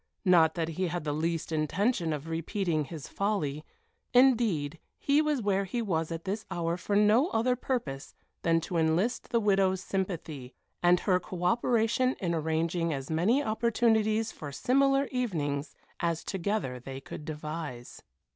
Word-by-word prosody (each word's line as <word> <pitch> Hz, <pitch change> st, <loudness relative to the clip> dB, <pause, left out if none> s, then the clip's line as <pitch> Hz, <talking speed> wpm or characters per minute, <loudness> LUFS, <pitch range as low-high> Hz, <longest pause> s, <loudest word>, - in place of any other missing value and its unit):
Not 165 Hz, -4 st, +5 dB
that 165 Hz, -2 st, -1 dB
he 180 Hz, +3 st, -1 dB
had 175 Hz, -1 st, -3 dB
the 150 Hz, -1 st, -1 dB
least 165 Hz, +2 st, -2 dB
intention 165 Hz, -, 0 dB
of 150 Hz, -1 st, -3 dB
not 165 Hz, -, -7 dB
repeating 165 Hz, -1 st, -1 dB
his 145 Hz, -1 st, -8 dB
folly 155 Hz, -8 st, -1 dB, 0.5 s
indeed, 220 Hz, -, +3 dB, 0.2 s
he 285 Hz, +2 st, +3 dB
was 300 Hz, -6 st, 0 dB
where 200 Hz, -1 st, +1 dB
he 220 Hz, +6 st, -3 dB
was 170 Hz, -7 st, -1 dB
at 165 Hz, 0 st, -4 dB
this 205 Hz, +3 st, -3 dB
hour 170 Hz, 0 st, -1 dB
for 200 Hz, +3 st, -2 dB
no 210 Hz, +8 st, +5 dB
other 250 Hz, -5 st, +1 dB
purpose 230 Hz, -, -4 dB, 0.3 s
than 165 Hz, -1 st, +2 dB
to 170 Hz, +1 st, -3 dB
enlist 165 Hz, +10 st, +1 dB
the 235 Hz, -, +2 dB
widow's 195 Hz, -3 st, +2 dB
sympathy, 165 Hz, -9 st, -4 dB, 0.3 s
and 175 Hz, 0 st, +4 dB
her 185 Hz, -3 st, +2 dB
co 180 Hz, 0 st, -7 dB
operation 235 Hz, +4 st, +2 dB
in 175 Hz, -3 st, -1 dB
arranging 165 Hz, +1 st, 0 dB
as 135 Hz, 0 st, -4 dB
many 210 Hz, -, +2 dB
opportunities 220 Hz, -1 st, +1 dB
for 145 Hz, -2 st, -8 dB
similar 275 Hz, -, +2 dB
evenings 160 Hz, -, -2 dB, 0.2 s
as 170 Hz, -2 st, -1 dB
together 190 Hz, -9 st, -2 dB
they 135 Hz, +2 st, -7 dB
could 135 Hz, +2 st, -9 dB
devise. 150 Hz, -5 st, -6 dB
180 Hz, 155 wpm, -29 LUFS, 160-220 Hz, 0.5 s, Not